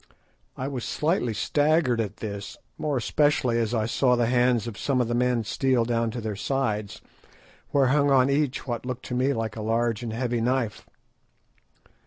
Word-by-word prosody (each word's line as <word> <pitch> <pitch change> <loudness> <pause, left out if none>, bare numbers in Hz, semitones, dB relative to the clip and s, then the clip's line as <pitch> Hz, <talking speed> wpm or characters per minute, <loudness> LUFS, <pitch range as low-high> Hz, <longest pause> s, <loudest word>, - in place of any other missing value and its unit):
I 130 - -3
was 130 -4 -4
slightly 150 - 0
staggered 145 -1 +2
at 105 -2 -5
this, 100 -2 -6 0.2
more 150 -3 -1
especially 125 -1 +2
as 115 -1 0
I 110 -1 +1
saw 125 +2 +2
the 120 -1 +2
hands 120 -1 +2
of 115 -3 -6
some 135 +5 0
of 125 - +1
the 120 - -1
men 125 -1 +1
steal 125 +2 +1
down 115 -1 0
to 120 - -5
their 110 -2 -3
sides, 110 -3 -2 0.7
where 140 -1 +3
hung 145 -1 +3
on 130 -2 +5
each 140 -1 0
what 120 -3 -3
looked 125 0 -5
to - - -3
me 130 +3 +2
like 115 -4 -3
a 110 - -5
large 115 +1 0
and 120 -2 -4
heavy 120 0 -1
knife. 120 -2 -1
120 Hz, 185 wpm, -26 LUFS, 115-135 Hz, 0.7 s, on